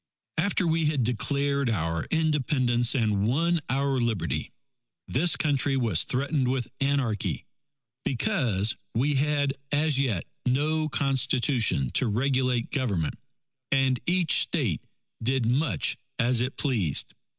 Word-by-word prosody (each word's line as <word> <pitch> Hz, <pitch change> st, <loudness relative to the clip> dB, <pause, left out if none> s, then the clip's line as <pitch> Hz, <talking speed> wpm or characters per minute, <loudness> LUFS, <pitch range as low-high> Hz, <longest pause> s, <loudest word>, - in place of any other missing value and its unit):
After 185 Hz, +1 st, +1 dB
we 165 Hz, -1 st, +1 dB
had 150 Hz, -4 st, +1 dB
declared 140 Hz, +3 st, 0 dB
our 85 Hz, -6 st, -1 dB
Independence 130 Hz, -6 st, +1 dB
and 105 Hz, -4 st, +1 dB
won 165 Hz, +7 st, +1 dB
our 135 Hz, 0 st, 0 dB
Liberty, 110 Hz, -8 st, -2 dB, 0.6 s
this 160 Hz, +7 st, +2 dB
Country 140 Hz, -2 st, +1 dB
was 110 Hz, -9 st, +2 dB
threatened 135 Hz, +1 st, -1 dB
with 125 Hz, -2 st, -2 dB
anarchy 135 Hz, -7 st, -1 dB, 0.6 s
because 120 Hz, -, +1 dB, 0.2 s
we 140 Hz, +6 st, +1 dB
had 145 Hz, 0 st, +1 dB, 0.2 s
as 145 Hz, -1 st, +2 dB
yet 115 Hz, -11 st, 0 dB, 0.2 s
no 155 Hz, +5 st, 0 dB
Constitution 130 Hz, -, +1 dB
to 130 Hz, -, +2 dB
regulate 125 Hz, +1 st, 0 dB
Government, 100 Hz, -, -1 dB, 0.6 s
and 135 Hz, -2 st, +2 dB
each 175 Hz, -2 st, +3 dB
State -, -, -1 dB, 0.4 s
did 125 Hz, +1 st, +1 dB
much 135 Hz, +5 st, +1 dB, 0.2 s
as 120 Hz, -2 st, +2 dB
it 130 Hz, +2 st, -3 dB
pleased. 110 Hz, -, 0 dB
130 Hz, 115 wpm, -26 LUFS, 120-145 Hz, 0.6 s, each